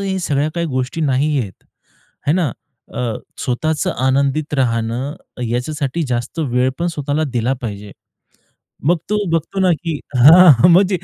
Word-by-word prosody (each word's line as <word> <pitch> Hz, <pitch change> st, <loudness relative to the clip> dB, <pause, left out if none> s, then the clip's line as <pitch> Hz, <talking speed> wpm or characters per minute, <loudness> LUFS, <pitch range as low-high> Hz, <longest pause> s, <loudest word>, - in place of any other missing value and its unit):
हे 195 Hz, -1 st, -2 dB
या 190 Hz, -, -1 dB
सगळ्या 150 Hz, -2 st, 0 dB
काही 170 Hz, -1 st, -1 dB
गोष्टी 130 Hz, +4 st, -3 dB
नाही 145 Hz, 0 st, +1 dB
आहेत, 100 Hz, -5 st, -5 dB, 0.7 s
आहे 145 Hz, -, +3 dB
ना. 165 Hz, -7 st, +1 dB, 0.4 s
अ, 120 Hz, -3 st, -2 dB, 0.3 s
स्वतःचं 150 Hz, +4 st, -1 dB, 0.2 s
आनंदित 140 Hz, +3 st, 0 dB
राहणं, 120 Hz, +2 st, -1 dB, 0.3 s
याच्यासाठी 140 Hz, +6 st, -2 dB
जास्त 120 Hz, +7 st, -3 dB
वेळ 130 Hz, -3 st, +1 dB
पण 170 Hz, -, -1 dB
स्वतःला 145 Hz, +2 st, -1 dB
दिला 120 Hz, +3 st, +1 dB
पाहिजे. 100 Hz, -2 st, -6 dB, 0.9 s
मग 175 Hz, +2 st, +4 dB
तो 210 Hz, -, +2 dB
बघतो 165 Hz, +4 st, -1 dB
ना, 185 Hz, -1 st, +3 dB
की 160 Hz, -3 st, -2 dB, 0.2 s
हां. 155 Hz, +2 st, +8 dB
म्हणजे 185 Hz, +1 st, +4 dB
145 Hz, 145 wpm, -18 LUFS, 125-165 Hz, 0.9 s, हां